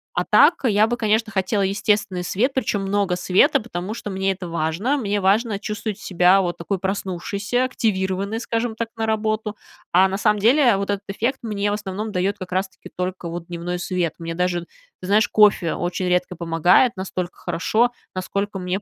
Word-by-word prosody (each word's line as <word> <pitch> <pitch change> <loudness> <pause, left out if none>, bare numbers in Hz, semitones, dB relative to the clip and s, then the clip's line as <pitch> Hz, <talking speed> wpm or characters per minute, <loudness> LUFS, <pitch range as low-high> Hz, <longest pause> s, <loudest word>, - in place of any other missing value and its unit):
А - - 0
так 340 - +6
я 215 -2 +4
бы, 240 +1 -2
конечно, 220 0 +1
хотела 195 +1 0
естественный 195 -1 0
свет, 225 +10 +1
причем 230 -6 -1
много 195 -1 0
света, 180 +3 +3
потому 200 -2 -5
что 210 - -6
мне 190 0 0
это 180 -2 -8
важно. 170 - 0
Мне 205 -4 -1
важно 205 +2 +2
чувствовать 210 -1 -4
себя 180 +1 +4
вот 175 -2 -2
такой 195 +4 -2
проснувшейся, 195 +4 -2
активированной, 200 -3 -1
скажем 230 -1 -2
так, 230 0 -3
на 225 - -1
работу. 215 -1 -1 0.4
А 190 +2 +5
на 195 - -2
самом 210 0 +2
деле 245 +1 +5
вот 200 +1 -3
этот 200 0 -1
эффект 235 +7 -2
мне, 205 -2 -1
в - - 0
основном, 210 +1 -5
дает 195 +2 -1
как 185 -1 -8
раз-таки 190 0 -3
только 180 -1 -4
вот 170 0 -6
дневной 175 +1 -4
свет. 175 -2 -1
Мне 165 0 -5
даже, 180 -1 0 0.4
ты 180 - -8
знаешь, 215 +3 +3
кофе 210 -5 +4
очень 175 +1 -2
редко 180 0 0
помогает 175 +7 +3
настолько 185 -2 -4
хорошо, 215 +7 +1 0.2
насколько 200 +1 -3
мне 185 +2 -2
195 Hz, 180 wpm, -22 LUFS, 180-215 Hz, 0.4 s, так